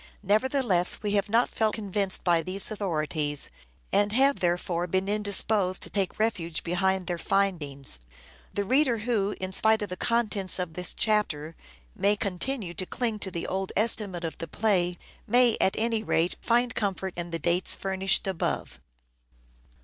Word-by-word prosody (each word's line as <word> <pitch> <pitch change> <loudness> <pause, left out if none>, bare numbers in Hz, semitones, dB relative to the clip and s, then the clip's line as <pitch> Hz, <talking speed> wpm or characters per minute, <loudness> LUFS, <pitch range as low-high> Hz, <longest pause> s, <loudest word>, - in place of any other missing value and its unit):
Nevertheless, 215 -3 +1
we 205 - 0
have 200 0 +1
not 230 +3 +3
felt 220 -1 0
convinced 200 -2 0
by 170 -2 +3
these 190 +5 0
authorities; 155 -7 -1 0.4
and 205 0 +3
have 275 +3 +3
therefore 175 0 0
been 190 +2 0
indisposed 205 -2 0
to - - -4
take 195 -3 -1
refuge 175 -7 -1
behind 190 +2 0
their 175 -1 -3
findings. 155 - 0 0.5
The 205 - -1
reader 260 +2 +2
who, 215 -3 -1
in 185 0 -4
spite 220 +2 +4
of 205 - -5
the 180 - -4
contents 220 -5 +2
of 180 -3 -3
this 180 +2 -1
chapter, 165 -8 0 0.4
may 200 0 +2
continue 200 0 -3
to 185 +2 -2
cling 230 -4 -2
to 190 - -3
the 170 -2 -4
old 190 0 -3
estimate 205 -5 +1
of 160 -2 -5
the 165 - -5
play, 180 -2 +1 0.3
may 245 0 +4
at 190 - +3
any 225 0 +1
rate 175 -5 0
find 240 +1 +2
comfort 190 -3 -2
in 175 0 -5
the 165 - -2
dates 175 +2 +1
furnished 195 +1 0
above. 190 -4 -3
195 Hz, 160 wpm, -27 LUFS, 175-215 Hz, 0.5 s, spite